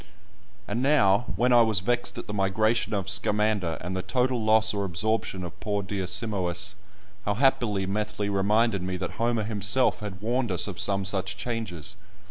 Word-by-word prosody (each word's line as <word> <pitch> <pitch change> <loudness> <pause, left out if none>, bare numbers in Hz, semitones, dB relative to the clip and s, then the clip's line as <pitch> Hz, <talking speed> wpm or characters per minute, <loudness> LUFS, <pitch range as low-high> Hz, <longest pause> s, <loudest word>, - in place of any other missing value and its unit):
And 120 - -2
now, 120 -6 +4
when 125 +5 +3
I 120 - +7
was 110 -4 +3
vexed 120 +5 -1
at - - -5
the 105 - -6
migration 105 +3 +1
of 95 -2 -2
Scamander, 105 -3 +1
and 90 +2 -4
the 95 - -1
total 125 +1 0
loss 110 0 +3
or 100 -1 -1
absorption 100 +1 -1
of 85 -1 -8
poor 105 -1 -2
dear 95 -1 -3
Simois, 100 -3 -1 0.5
how 105 - -1
happily 115 -6 +2
Methley 105 +1 -2
reminded 100 +1 +2
me 90 0 -3
that 95 - -4
Homer 115 -1 +1
himself 105 +4 +2
had 100 -3 -7
warned 120 +1 -1
us 90 - +1
of 95 -4 -6
some 100 0 +1
such 95 -1 -1
changes! 100 -6 -4
105 Hz, 175 wpm, -26 LUFS, 95-115 Hz, 0.5 s, I